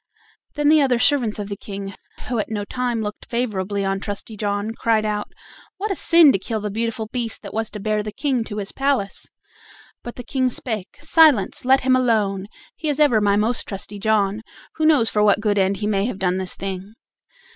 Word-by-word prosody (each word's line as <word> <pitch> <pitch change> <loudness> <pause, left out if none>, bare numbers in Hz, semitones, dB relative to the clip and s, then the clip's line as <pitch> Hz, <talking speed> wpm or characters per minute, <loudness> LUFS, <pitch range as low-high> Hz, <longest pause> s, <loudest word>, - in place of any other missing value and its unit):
Then 295 -1 +2
the 310 0 +6
other 260 -3 +3
servants 240 -4 +2
of 205 -1 -4
the 200 - -4
King, 195 0 -7 0.3
who 240 -3 -1
at 210 - -2
no 205 -2 -3
time 245 -1 -2
looked 210 0 -7
favorably 205 -5 -2
on 195 0 -1
Trusty 205 +2 -6
John, 205 +1 -2
cried 225 -2 +1
out: 210 -1 -2 0.5
"What 410 +2 -2
a - - 0
sin 335 -4 +6
to 195 - 0
kill 220 +3 -3
the 210 0 -4
beautiful 225 +1 -2
beast 235 -3 -3
that 200 - -8
was 225 0 -2
to 210 - -8
bear 215 +1 0
the 210 0 -5
King 255 +1 -1
to 210 -2 -6
his 200 -2 -4
palace!" 270 -8 -1 0.7
But 240 - -8
the 245 - -8
King 260 +1 0
spake: 220 -5 -5
"Silence! 305 - +4
let 265 +1 +5
him 260 0 +3
alone; 210 -6 +1 0.3
he 310 - -3
is 290 0 -1
ever 265 -8 +4
my 200 -1 +3
most 220 +4 +1
trusty 200 +1 -6
John. 210 0 +1 0.4
Who 315 -1 +2
knows 275 -8 +4
for 210 - +1
what 210 -1 +4
good 210 -2 +1
end 195 +1 +1
he 210 - -3
may 200 -1 +1
have 245 - -4
done 185 -1 0
this 185 -1 -2
thing?" 195 +2 -6
215 Hz, 210 wpm, -21 LUFS, 200-250 Hz, 0.7 s, the